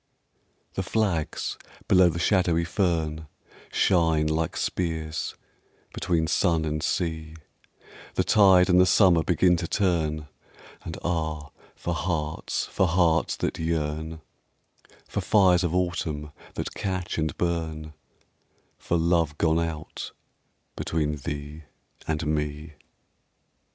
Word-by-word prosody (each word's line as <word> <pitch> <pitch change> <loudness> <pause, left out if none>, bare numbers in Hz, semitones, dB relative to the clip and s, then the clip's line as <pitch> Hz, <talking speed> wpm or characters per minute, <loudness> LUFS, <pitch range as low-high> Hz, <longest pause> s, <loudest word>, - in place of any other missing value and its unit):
THE - - -2
flags 95 -5 -1 0.3
below 90 -1 +6
the 85 - -3
shadowy 85 -2 +2
fern 80 -4 -1 0.4
Shine 80 -4 +3
like 80 +1 -1
spears 80 -4 -2 0.6
between 85 -2 0
sun 80 -1 +2
and 75 0 -2
sea, 80 -2 -2 0.8
The - - +2
tide 95 -4 +6
and 90 -1 +5
the 90 - +4
summer 90 -2 +5
begin 90 +1 +3
to 85 0 -3
turn, 80 -6 0 0.6
And 80 - -6
ah, 80 -3 -2 0.2
for 85 - -3
hearts, 80 -2 -2
for 95 - +1
hearts 85 -2 +2
that - - -3
yearn, 80 0 -2 0.9
For - - -2
fires 95 -4 +4
of 90 0 0
autumn 80 -4 -2 0.2
that - - -4
catch 95 -4 -3
and 80 0 -2
burn, 80 -3 -2 0.9
For 85 - 0
love 85 -3 +1
gone 80 0 +2
out 80 -2 -5 0.6
between 75 -2 -1
thee 75 +2 -6 0.4
and 80 0 -1
me. 75 0 -2
80 Hz, 115 wpm, -26 LUFS, 80-90 Hz, 0.9 s, below